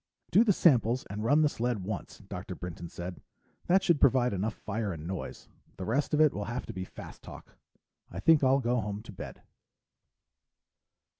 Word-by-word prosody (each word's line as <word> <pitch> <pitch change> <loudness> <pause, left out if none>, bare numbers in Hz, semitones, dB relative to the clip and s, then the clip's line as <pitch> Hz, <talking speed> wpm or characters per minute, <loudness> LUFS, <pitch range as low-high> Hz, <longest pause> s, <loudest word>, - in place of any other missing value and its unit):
"Do 220 - +6
the 225 - +4
samples 125 - +3
and 105 +1 -4
run 145 +7 +4
the - - +5
sled 120 -7 -2
once," 105 +1 -6
Dr. 95 0 -6
Brinton 85 -1 -7
said. 90 +1 -7 0.5
"That 190 +2 +4
should 170 -5 +3
provide 125 -3 +4
enough 105 +3 -1
fire 110 -1 -3
and 80 -3 -7
noise. 95 +2 -6 0.3
The 95 - -5
rest 140 - +1
of - - +1
it 155 -2 +5
will 105 - -3
have 120 +2 -4
to - - -7
be 95 - -4
fast - - -11
talk. - - -12 0.5
I 85 - -6
think 155 +6 +5
I'll 135 +1 +4
go 120 0 +1
home 105 +1 -5
to 115 - -10
bed." 95 - -9
115 Hz, 190 wpm, -30 LUFS, 95-135 Hz, 0.5 s, Do